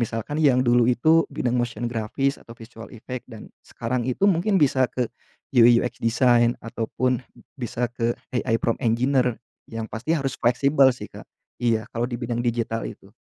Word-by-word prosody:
Misalkan 120 +6 -3
yang 130 -4 +4
dulu 120 0 +4
itu 160 +7 +4
bidang 125 0 -1
motion 120 0 -2
grafis 120 +5 -2
atau 115 - -13
visual 115 -1 -11
effect 125 +2 -8
dan 110 -2 -10 0.2
sekarang 120 +1 -3
itu 195 +11 +1
mungkin 190 +2 +2
bisa 130 -4 +3
ke 125 -2 -1 0.5
UI/UX 120 0 +4
design 120 0 +3
ataupun 125 +3 -2 0.3
bisa 120 -1 -3
ke 115 0 0 0.2
AI 115 -2 +1
prompt 115 +4 -1
engineer, 125 +1 +1 0.3
yang 115 -1 -4
pasti 115 +8 -5
harus 135 -2 -2
fleksibel 135 +3 +4
sih, 125 - -7
Kak. - - -10 0.4
Iya 115 -1 +1
kalau 120 +1 -1
di 120 - -3
bidang 120 -1 -3
digital 115 -1 -1
itu. - - -13
120 Hz, 165 wpm, -24 LUFS, 115-130 Hz, 0.5 s, yang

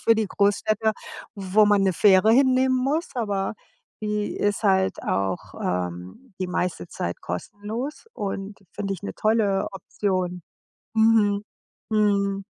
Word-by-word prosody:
für 230 - +6
die 220 -1 0
Großstädte, 215 +2 +1 0.4
wo 200 +1 +3
man 205 -1 +4
'ne 190 - +3
Fähre 195 +3 +5
hinnehmen 260 0 +4
muss, 280 +7 0
aber 205 -4 -1 0.5
die 210 -1 -2
ist 205 +1 0
halt 190 -2 +2
auch, 95 -2 -2
ähm, 90 - -4
die 185 - 0
meiste 180 -1 -2
Zeit 85 - -4
kostenlos 215 - -5
und 195 - -4
finde 195 -1 -3
ich 185 - -11
'ne 200 - -4
tolle 215 -3 +1
Option. 185 -2 -2 0.5
Mhm. 220 -2 +4 0.5
Mhm. 200 -2 +1
205 Hz, 130 wpm, -24 LUFS, 190-220 Hz, 0.5 s, für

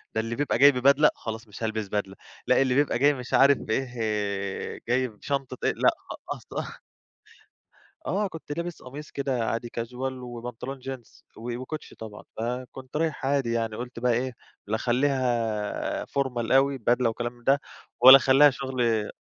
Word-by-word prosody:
ده 110 - +2
اللي 115 +1 -4
بيبقى 145 -3 0
جاي 140 +3 +8
ببدلة، 140 +3 +5
خلاص 110 0 -6
مش 105 +2 -9
هالبس 110 -1 -2
بدلة، 100 -1 -3 0.3
لأ، 130 +1 +4
اللي 130 -2 +2
بيبقى 140 -3 +2
جاي 145 +2 +5
مش 125 -2 -8
عارف 140 0 +6
بإيه، 105 -5 -3
جاي 130 +2 +2
بشنطة 135 +4 -4
إيه، - - +2
لأ - - +4 0.2
خ - - -4 0.2
أصل. - - -7 1.3
آه، 200 +2 0
كنت 160 -4 -8
لابس 170 +2 -5
قميص 140 +4 -9
كده 135 -4 -1
عادي 115 +1 -3
casual، 125 +3 -4
وبنطلون 125 +2 -7
jeans، 130 -3 -9
و 120 +1 -5
وكوتش 130 +5 -7
طبعًا. 110 -2 -9 0.2
فكنت 125 +3 -5
رايح 155 -3 -1
عادي 135 -4 +1
يعني، 115 -2 -1
قُلت 125 +1 -7
بقى 125 +1 +2
إيه 125 +2 -1 0.3
لا 105 +2 0
أخلّيها 120 -4 0
formal 125 -4 -2
أوي، 135 0 +3
بدلة 120 +1 +2
وكلام 120 +1 -4
من 120 0 -21
ده، 140 +3 +4 0.4
ولا 130 +2 +12
أخلّيها 135 +2 +6
شغل. 125 -5 -1
125 Hz, 160 wpm, -26 LUFS, 115-135 Hz, 1.3 s, ولا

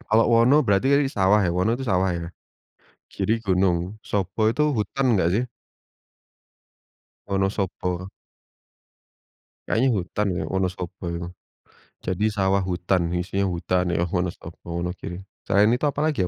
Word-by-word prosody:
Kalau 115 -1 +3
Wono 130 +6 +5
berarti 100 +5 +2
tadi 140 0 +4
sawah 100 +2 +4
ya? 90 - +1
Wono 95 +7 +1
tuh 135 - -5
sawah 95 -3 +2
ya? 85 - -5 0.9
Giri 110 - 0
gunung, 95 +1 0
Sobo 100 +2 0
itu 150 +7 +1
hutan 125 +3 0
nggak 95 -5 +3
sih? 120 - +1 1.8
Wonosobo. 95 -2 -2 1.6
Kayaknya 125 +4 +2
hutan 100 +3 -2
ya - - -2
Wonosobo 95 -1 -3
itu. 85 0 -4 0.8
Jadi 95 +3 -1
sawah 95 0 +2
hutan, 90 +1 +1
isinya 95 +3 -1
hutan 90 +1 0
ya 85 - +1
Wonosobo, 90 -1 -4
Wonogiri. 90 0 -4 0.3
Selain 105 +3 +4
itu 125 +5 +1
apalagi 150 +1 0
ya - - -1
95 Hz, 130 wpm, -24 LUFS, 90-110 Hz, 1.8 s, Wono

